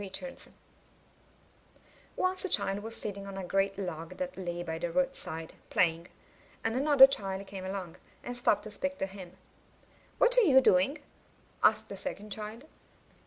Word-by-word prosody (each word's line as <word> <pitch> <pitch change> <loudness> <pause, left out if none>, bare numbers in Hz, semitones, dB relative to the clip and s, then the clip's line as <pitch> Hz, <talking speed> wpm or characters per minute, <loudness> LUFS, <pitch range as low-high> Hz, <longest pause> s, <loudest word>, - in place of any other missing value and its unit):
Richards 205 +7 -6 1.7
Once 370 0 0
a 385 - -2
child 195 - +3
was 225 +2 -5
sitting 200 -1 -5
on 195 -1 -7
a 190 - -4
great 195 +2 0
log 165 -4 -5
that 275 0 -4
lay 175 -2 -4
by 160 -1 -4
the 170 0 -2
roadside, 165 -11 -2 0.2
playing; 170 -1 +1 0.6
and 225 +1 0
another 280 0 +8
child 195 -7 -2
came 195 -1 -8
along, 190 -3 -5 0.3
and 245 - -5
stopped 245 -4 +2
to 215 - -8
speak 280 +6 -3
to - - -1
him. 190 -2 -11 0.8
*'What - - +4
are - - +6
you 285 - +6
doing?'' 265 +6 +3 0.6
asked - - +4
the - - -7
second 210 -7 -6
child. 215 +5 -5
200 Hz, 160 wpm, -30 LUFS, 185-265 Hz, 1.7 s, another